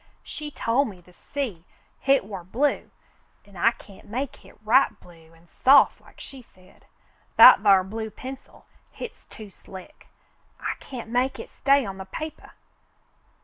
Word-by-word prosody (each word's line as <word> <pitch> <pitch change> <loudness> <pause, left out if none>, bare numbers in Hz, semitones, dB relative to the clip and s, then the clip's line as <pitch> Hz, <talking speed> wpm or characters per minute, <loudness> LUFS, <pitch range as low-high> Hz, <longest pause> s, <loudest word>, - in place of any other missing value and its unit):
"She 300 -1 -8
tol' 255 -1 0
me 200 -7 -9
the 180 +1 -21
sea, 230 -8 -5 0.4
hit 275 -5 +2
war 195 -3 -8
blue, 255 +11 -1 0.6
an' 200 -1 -19
I 180 +6 +4
can't 205 -4 -14
make 250 +6 -4
hit - - -19
right 245 +6 +3
blue 165 -2 -19
an' 165 +1 -24
soft 270 - +4
like - - -20
she 270 -2 -11
said. 185 -5 -24 0.5
That - - +9
thar 195 -3 +5
blue 220 +3 -6
pencil, 260 +4 -11 0.3
hit's 465 - -10
too 215 -2 -12
slick. 190 - -14 0.5
I - - -3
can't 240 -4 -9
make 255 +2 0
hit - - -10
stay 275 -1 +2
on 195 -1 -7
the 190 - -8
papah." 310 +10 -8
220 Hz, 155 wpm, -24 LUFS, 190-270 Hz, 0.6 s, That